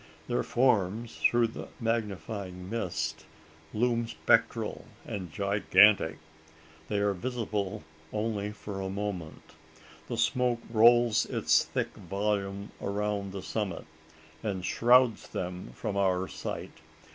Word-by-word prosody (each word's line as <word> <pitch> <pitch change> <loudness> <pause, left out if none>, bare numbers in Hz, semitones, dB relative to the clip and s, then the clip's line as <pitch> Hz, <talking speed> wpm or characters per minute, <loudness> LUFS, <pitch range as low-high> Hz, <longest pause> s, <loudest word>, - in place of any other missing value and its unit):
Their - - +1
forms 115 -2 +1
through 120 -1 +3
the - - -8
magnifying 100 -5 -3
mist 80 -8 -3 0.4
loom 120 +1 +1
spectral - - +1 0.2
and 95 -5 -5
gigantic! 100 -2 +4 0.7
They 105 - -1
are 100 0 +2
visible 105 -3 -3 0.3
only 105 -1 -2
for 105 -2 -6
a 95 - -3
moment. 95 -5 -5 0.5
The - - -3
smoke 125 -2 +1
rolls 120 0 +5
its - - +3
thick - - -2
volume 100 +1 -2
around 100 0 -2
the 95 -1 -6
summit, 105 -6 -3 0.6
and 95 -4 -3
shrouds 120 0 +4
them 90 -4 -5
from 100 - -3
our 95 -2 +1
sight. - - -6
105 Hz, 110 wpm, -29 LUFS, 95-115 Hz, 0.7 s, rolls